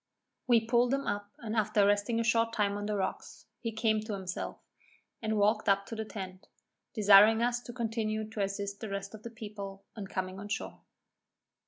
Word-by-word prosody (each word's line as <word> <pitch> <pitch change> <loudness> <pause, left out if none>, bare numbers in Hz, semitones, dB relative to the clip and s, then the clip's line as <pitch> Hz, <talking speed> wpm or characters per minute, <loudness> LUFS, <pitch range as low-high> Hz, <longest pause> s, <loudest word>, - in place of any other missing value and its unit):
We 230 -2 +4
pulled 240 +1 +3
him 275 - -3
up, 205 0 -2
and 225 -1 -5
after 210 -2 +3
resting 205 +3 +2
a - - +2
short 230 0 +2
time 205 -2 +1
on 205 0 -3
the 210 - -1
rocks, 190 -2 -4
he 230 - -3
came 220 0 +1
to 215 0 -5
himself, 190 -2 -4 0.6
and 220 -1 0
walked 210 +1 +3
up 200 0 +3
to 225 - -6
the 220 0 -3
tent, 190 -3 -8 0.5
desiring 210 +1 +7
us 240 0 +1
to 245 - -9
continue 220 -2 -2
to 220 -1 -4
assist 200 0 -2
the 220 - -5
rest 200 +1 -4
of 215 - -9
the 235 - -7
people 205 -4 -8
in 205 -3 -6
coming 185 0 -4
on 205 - -7
shore. 205 - -4
215 Hz, 195 wpm, -31 LUFS, 200-225 Hz, 0.6 s, desiring